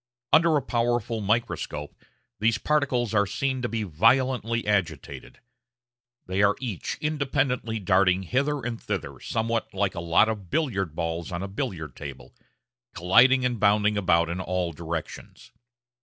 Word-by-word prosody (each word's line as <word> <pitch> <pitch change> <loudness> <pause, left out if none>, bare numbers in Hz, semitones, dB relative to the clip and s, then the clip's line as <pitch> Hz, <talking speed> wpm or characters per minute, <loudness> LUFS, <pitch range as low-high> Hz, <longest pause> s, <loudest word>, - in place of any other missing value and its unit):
Under 160 -1 +5
a 140 - -1
powerful 120 -2 -1
microscope 105 -8 -2 0.5
these 115 +1 +2
particles 125 -5 0
are 100 -1 +3
seen 130 +3 -2
to 120 - -2
be 115 -1 -2
violently 115 - +2
agitated; 90 -8 -2 0.9
they 95 +2 -1
are 100 0 +4
each 115 -9 -4
independently 135 -6 -1
darting 95 -2 +2
hither 140 - -1
and 115 -1 -4
thither - - -4
somewhat 115 0 -2
like 100 0 0
a 90 - -5
lot 85 +5 +4
of 105 -5 -4
billiard 95 - -1
balls 85 0 -3
on 85 +1 -3
a - - -3
billiard 95 - -5
table, 65 -4 -9 0.6
colliding 125 +9 +5
and 120 -3 -1
bounding 105 +1 +3
about 85 -4 +2
in 85 +2 -4
all 90 -2 -2
directions. 85 0 -7
105 Hz, 140 wpm, -26 LUFS, 90-125 Hz, 0.9 s, Under